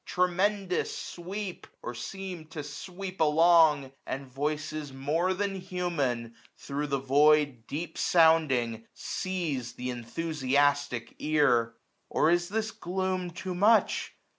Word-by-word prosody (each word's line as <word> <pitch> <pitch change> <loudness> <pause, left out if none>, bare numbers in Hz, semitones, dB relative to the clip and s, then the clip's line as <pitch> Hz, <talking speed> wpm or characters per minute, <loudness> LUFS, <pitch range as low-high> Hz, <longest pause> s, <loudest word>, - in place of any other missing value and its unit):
Tremendous 185 +1 0
sweep, 185 +2 -6 0.2
or 120 - -4
seem 180 +5 -6
to 155 -2 -6
sweep 185 +5 -7
along; 155 -3 +5 0.2
And 135 +1 -4
voices 150 +2 -3
more 150 +7 0
than 200 +1 -1
human, 145 -11 -2 0.2
thro' 145 +1 -3
the 140 -1 0
void 140 -2 +3
Deep 165 +2 -5
sounding, 135 -9 +3
seize 165 -10 -3
th* 125 +1 -5
enthusiastic 140 0 0
ear. 125 -7 +2 0.3
Or 155 - +3
is 175 +1 +1
this 220 +2 -1
gloom 185 -3 -2
too 180 +2 -5
much 210 +5 +3
155 Hz, 115 wpm, -29 LUFS, 140-180 Hz, 0.3 s, along